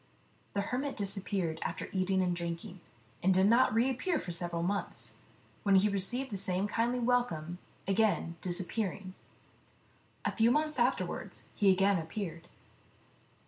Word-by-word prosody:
The 200 Hz, -, +2 dB
hermit 265 Hz, +7 st, -2 dB
disappeared, 195 Hz, -5 st, -1 dB
after -, -, -3 dB
eating 190 Hz, 0 st, +1 dB
and 180 Hz, -1 st, 0 dB
drinking, 170 Hz, +2 st, -5 dB, 0.4 s
and 190 Hz, -, +3 dB
did 190 Hz, +1 st, +4 dB
not 235 Hz, +5 st, +5 dB
reappear 255 Hz, -, +1 dB
for 180 Hz, -, -5 dB
several 170 Hz, 0 st, -2 dB
months, 200 Hz, +3 st, -2 dB, 0.4 s
when 200 Hz, -2 st, +3 dB
he 195 Hz, +2 st, +5 dB
received 235 Hz, +7 st, 0 dB
the 200 Hz, -, -2 dB
same 190 Hz, +1 st, +2 dB
kindly 235 Hz, +3 st, 0 dB
welcome, 230 Hz, -9 st, 0 dB, 0.3 s
again 195 Hz, -4 st, +1 dB
disappearing. 185 Hz, +1 st, -1 dB, 1.1 s
A -, -, +2 dB
few 225 Hz, 0 st, +4 dB
months 300 Hz, +1 st, +1 dB
afterwards 245 Hz, +2 st, -1 dB
he 200 Hz, -3 st, +4 dB
again 195 Hz, 0 st, +3 dB
appeared. 170 Hz, 0 st, -5 dB
195 Hz, 135 wpm, -32 LUFS, 180-230 Hz, 1.1 s, not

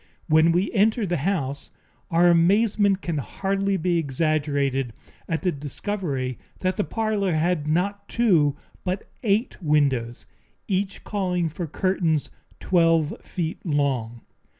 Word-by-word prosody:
When 160 Hz, +1 st, +5 dB
we 180 Hz, +4 st, +1 dB
entered 215 Hz, -1 st, +2 dB
the 175 Hz, -, +1 dB
house, 145 Hz, -4 st, -2 dB, 0.4 s
our 170 Hz, +1 st, +4 dB
amazement 195 Hz, +3 st, +3 dB
can 165 Hz, -4 st, -1 dB
hardly 195 Hz, +6 st, -1 dB
be 175 Hz, 0 st, +1 dB
exaggerated 140 Hz, -4 st, 0 dB, 0.4 s
at 165 Hz, -1 st, -1 dB
the 180 Hz, -, +2 dB
discovery 140 Hz, -, -4 dB, 0.2 s
that 185 Hz, 0 st, 0 dB
the 210 Hz, -, 0 dB
parlor 215 Hz, -5 st, -1 dB
had 155 Hz, -1 st, 0 dB
not 195 Hz, +6 st, -1 dB
two 170 Hz, -, +3 dB, 0.3 s
but 185 Hz, +2 st, -3 dB
eight 215 Hz, 0 st, 0 dB
windows, 140 Hz, -7 st, +1 dB, 0.4 s
each 195 Hz, 0 st, -2 dB
calling 180 Hz, -5 st, -1 dB
for 170 Hz, +2 st, -5 dB
curtains 165 Hz, -2 st, 0 dB, 0.3 s
twelve 165 Hz, -3 st, +2 dB
feet 170 Hz, -3 st, -4 dB
long. 135 Hz, -, -1 dB
170 Hz, 125 wpm, -24 LUFS, 145-195 Hz, 0.4 s, When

